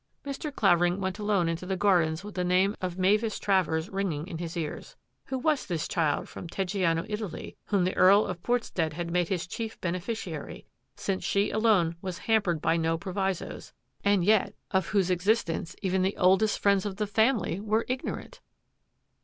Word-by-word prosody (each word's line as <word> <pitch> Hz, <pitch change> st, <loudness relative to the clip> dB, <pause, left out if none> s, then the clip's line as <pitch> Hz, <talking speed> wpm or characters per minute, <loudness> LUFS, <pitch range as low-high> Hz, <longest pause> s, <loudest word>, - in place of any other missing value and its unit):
Mr. 285 Hz, +2 st, -4 dB
Clavering 175 Hz, -6 st, +3 dB
went 190 Hz, 0 st, -3 dB
alone 205 Hz, -5 st, +1 dB
into 165 Hz, +1 st, -2 dB
the 190 Hz, +1 st, -2 dB
gardens 175 Hz, -4 st, +2 dB
with 210 Hz, 0 st, -8 dB
the 180 Hz, -, -1 dB
name 185 Hz, +3 st, +2 dB
of 180 Hz, -1 st, -3 dB
Mavis 210 Hz, +4 st, +2 dB
Travers 175 Hz, -5 st, +1 dB
ringing 190 Hz, -7 st, -2 dB
in 165 Hz, -3 st, -7 dB
his 170 Hz, 0 st, -5 dB
ears. 160 Hz, -3 st, -5 dB, 0.3 s
Who 265 Hz, -, -3 dB
was 295 Hz, +1 st, 0 dB
this 170 Hz, -5 st, -2 dB
child 155 Hz, -4 st, 0 dB
from -, -, -8 dB
Teggiano, 180 Hz, -2 st, 0 dB
Italy, 210 Hz, -3 st, -5 dB
whom 200 Hz, -3 st, +1 dB
the 185 Hz, -, 0 dB
Earl 195 Hz, +3 st, +6 dB
of 180 Hz, -2 st, -5 dB
Portstead 190 Hz, -10 st, -1 dB
had 170 Hz, +1 st, -4 dB
made 175 Hz, -1 st, +1 dB
his 180 Hz, -2 st, -2 dB
chief 225 Hz, +4 st, -6 dB
ben 170 Hz, -2 st, -1 dB
eficiary, 180 Hz, -5 st, -5 dB, 0.3 s
since 190 Hz, -1 st, -2 dB
she 200 Hz, +1 st, +1 dB
alone 200 Hz, -7 st, +2 dB
was 185 Hz, -2 st, -4 dB
hampered 200 Hz, -8 st, +1 dB
by 165 Hz, -, +3 dB
no 165 Hz, 0 st, +1 dB
pro 185 Hz, +2 st, -6 dB
visos, 195 Hz, -2 st, -3 dB, 0.3 s
and 200 Hz, -3 st, +3 dB
yet 210 Hz, -1 st, +3 dB, 0.2 s
of 190 Hz, -2 st, +1 dB
whose 190 Hz, -3 st, +1 dB
existence 180 Hz, -2 st, 0 dB
even 190 Hz, 0 st, +1 dB
the 190 Hz, +2 st, 0 dB
oldest 190 Hz, +3 st, +4 dB
friends 200 Hz, -2 st, +3 dB
of 195 Hz, -, -5 dB
the 210 Hz, +1 st, -1 dB
family 220 Hz, -3 st, +1 dB
were 215 Hz, +2 st, 0 dB
ignorant? 255 Hz, +1 st, -5 dB
190 Hz, 180 wpm, -28 LUFS, 175-210 Hz, 0.3 s, Earl